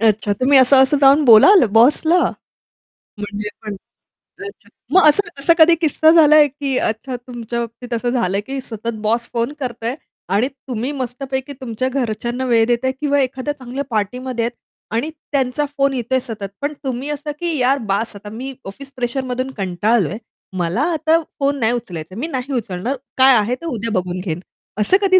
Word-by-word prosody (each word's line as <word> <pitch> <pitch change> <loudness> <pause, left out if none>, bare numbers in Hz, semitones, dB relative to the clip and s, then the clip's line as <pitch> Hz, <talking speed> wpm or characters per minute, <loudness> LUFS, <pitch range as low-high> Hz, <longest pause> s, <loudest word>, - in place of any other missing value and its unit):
अच्छा. 215 -2 +2
तुम्ही 270 +1 +5
असं-असं 265 +2 +5
जाऊन 280 +2 +6
बोलाल 250 - +8
बॉसला? 295 +9 +4 1.0
म्हणजे 205 0 -5
पण 210 -1 -5 0.7
अच्छा 405 - -11 0.2
मग 375 -5 +6
असं 405 +8 +4
असा 335 +4 +4
कधी 335 +1 +7
किस्सा 315 -1 +2
झालाय 305 -2 +6
की 275 -2 -3
अच्छा 235 +4 -2
तुमच्या 240 -1 -6
बाबतीत 235 +1 -6
असं 240 +1 -1
झालंय 205 -5 0
की 270 +5 -5
सतत 230 -1 -5
बॉस 235 +2 +1
फोन 235 +4 -1
करतोय 240 -1 -4 0.4
आणि 230 +5 +2
तुम्ही 260 -1 -5
मस्तपैकी 265 +1 -4
तुमच्या 255 +1 -2
घरच्यांना 245 0 -2
वेळ 230 -2 +3
देताय 245 +2 +1
किंवा 285 -1 +1
एखाद्या 265 +2 -2
चांगल्या 260 +2 -5
पार्टीमध्ये 235 +2 -2
आहेत 240 - -2 0.4
आणि 290 +7 -1 0.2
त्यांचा 270 +1 0
फोन 275 0 +2
येतोय 260 +1 0
सतत. 225 -5 -6
पण 290 +1 -2
तुम्ही 260 +2 -4
असं 295 0 -4
की 340 -3 -2
"यार 260 +2 +2
बास 210 +2 -1
आता 205 +1 -10
मी 255 +5 -7
ऑफिस 275 +8 -9
प्रेशरमधून 255 +1 -2
कंटाळलोय, 195 0 0 0.4
मला 175 +8 -1
आता 320 +1 +2 0.2
फोन 280 0 0
नाही 225 0 +2
उचलायचा, 185 -7 -6
मी 280 +8 -3
नाही 265 -2 -4
उचलणार, 230 +1 -3 0.2
काय 260 -1 +7
आहे 220 +4 0
तर 335 - -8
उद्या 230 -6 -3
बघून 180 0 -5
घेईन." 175 -3 -4 0.4
असं 365 - +4
कधी 375 -1 +5
255 Hz, 165 wpm, -19 LUFS, 225-280 Hz, 1.0 s, बोलाल